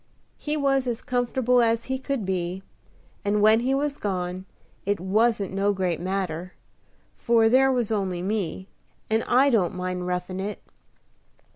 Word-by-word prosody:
He 300 0 -2
was 270 -2 +1
as 235 -1 -3
comfortable 245 0 +1
as 230 0 +2
he 265 0 -3
could 265 -5 -3
be; 185 0 -2 0.6
and, 205 +1 +1
when 215 +2 +5
he 260 +3 +1
was 285 +1 -1
gone, 185 -2 -3 0.4
it 200 -1 0
wasn't 205 +2 +1
no 200 +1 +1
great 185 -4 -1
matter, 185 -2 -3 0.7
for 230 -1 +4
there 265 +3 +5
was 245 -4 0
only 190 -4 -1
me, 190 -2 -2 0.4
and 220 +1 +2
I 270 +3 +4
don't 190 -7 +2
mind 180 0 -3
roughin' 180 +1 -3
it." 205 +2 -4
210 Hz, 150 wpm, -25 LUFS, 185-245 Hz, 0.7 s, when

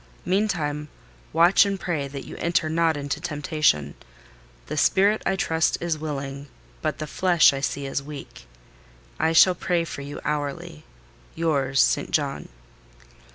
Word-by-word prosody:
Meantime, 170 -7 -1 0.4
watch 170 +5 +5
and 200 -1 -2
pray 155 -7 -2
that 140 0 -8
you - - -9
enter 170 -2 0
not 160 0 +1
into 145 -1 -4
temptation: 150 - 0 0.7
the 150 - -5
spirit, 200 +8 +3
I 195 - +2
trust, 165 -3 +1
is 170 -2 -1
willing, 140 -2 -5 0.3
but - - -2
the 155 - -4
flesh, 175 -2 +4
I 135 - -3
see, 140 0 -2
is 135 +1 -2
weak. 135 - -10 0.7
I 160 - +2
shall 175 +3 +6
pray 175 -1 0
for 145 - -7
you 145 +1 -7
hourly.—Yours, 150 - -3
ST. - - +1
JOHN." 140 -3 -1
155 Hz, 140 wpm, -24 LUFS, 140-170 Hz, 0.7 s, shall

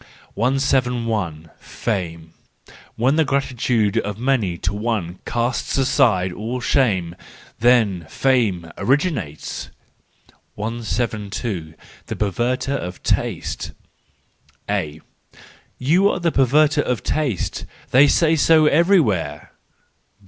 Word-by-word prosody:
i;i. 125 -5 +1 0.3
Fame. 85 -6 -4 0.6
—When 130 +6 +2
the 160 - +5
gratitude 125 -6 0
of 105 0 -4
many 115 -8 0
to 90 +3 -2
one 105 -5 -2
casts 120 +3 -1
aside 115 -9 +2
all 115 +6 -4
shame, 100 - +1 0.4
then 110 -8 +3
fame 105 -11 +1
originates. 135 - -1 0.9
172. 105 -5 -3 0.3
The - - -4
Perverterof 120 0 -2
Taste. - - -2 0.9
—A: 75 +1 -2 0.8
"You 175 +10 +3
are - - -1
a 170 - +2
perverter 145 +3 +3
of 125 -4 -2
taste—they 135 - 0
say 165 +2 +3
so 155 0 +5
everywhere! 145 - +2
120 Hz, 90 wpm, -21 LUFS, 95-135 Hz, 0.9 s, the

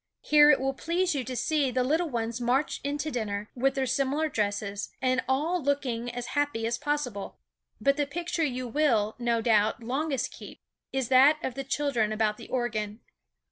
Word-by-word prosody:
Here 295 0 +6
it 295 - +6
will 270 +1 0
please 345 +5 0
you 275 -3 -1
to 255 +1 -5
see 275 +3 +1
the 255 0 0
little 320 +6 +1
ones 235 -1 -3
march 255 +4 0
into 290 +2 -2
dinner, 210 -4 -3
with 270 +2 +1
their 265 -1 0
similar 275 +4 0
dresses, 205 -3 -2
and 255 0 +1
all 315 +7 +1
looking 255 -4 -1
as 245 0 -5
happy 290 -6 0
as 235 +1 -1
possible. 265 -9 -3 0.4
But 275 +1 +2
the 290 -1 0
picture 340 +2 -2
you 255 -3 -2
will, 230 -6 +1
no 235 -1 0
doubt, 220 0 +2
longest 270 +3 -1
keep, - - -11 0.3
is 265 -3 -1
that 270 +4 +6
of 260 - -2
the 275 +2 -4
children 270 -6 0
about 215 -1 0
the - - -10
organ. 220 -4 -2
260 Hz, 180 wpm, -28 LUFS, 230-290 Hz, 0.4 s, Here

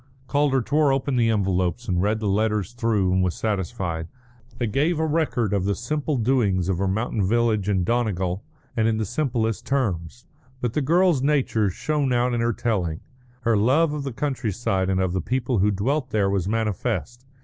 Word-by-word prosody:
Calder 140 -2 +1
tore 145 +2 +2
open 135 0 0
the 115 -2 +3
envelopes 95 +1 0
and 90 -2 +1
read 105 +3 +1
the 110 - -2
letters 105 0 0
through 110 -6 +1
and 95 - +2
was 90 -2 0
satisfied. 95 -6 -2 0.5
They 120 - -1
gave 150 +9 +1
a 160 - +1
record 145 - 0
of 100 -2 +1
the 100 +1 0
simple 150 +3 -2
doings 105 -7 +1
of 90 -2 0
her 100 - +1
mountain 105 +1 -1
village 110 -1 +1
in 95 -3 +2
Donegal, 95 -4 -1 0.3
and 110 -1 +2
in 110 -1 +1
the 110 - -1
simplest 115 -2 -1
terms. 115 - -2 0.3
But 120 -3 -2
the 150 - 0
girl's 170 0 +3
nature 135 -7 +2
shone 145 - -1
out 120 +1 +1
in 120 - 0
the 115 0 +2
telling. 95 -9 -1 0.4
Her 115 -2 +2
love 140 +9 +3
of 150 - -3
the 140 -1 -4
country 125 -3 -2
side 95 -3 -1
and 95 -1 +1
of 95 -2 0
the 95 - 0
people 125 +2 -1
who 100 +3 +3
dwelt 130 +8 -1
there 100 -5 +1
was 95 -2 0
manifest. 115 +3 -2
115 Hz, 195 wpm, -24 LUFS, 95-130 Hz, 0.5 s, the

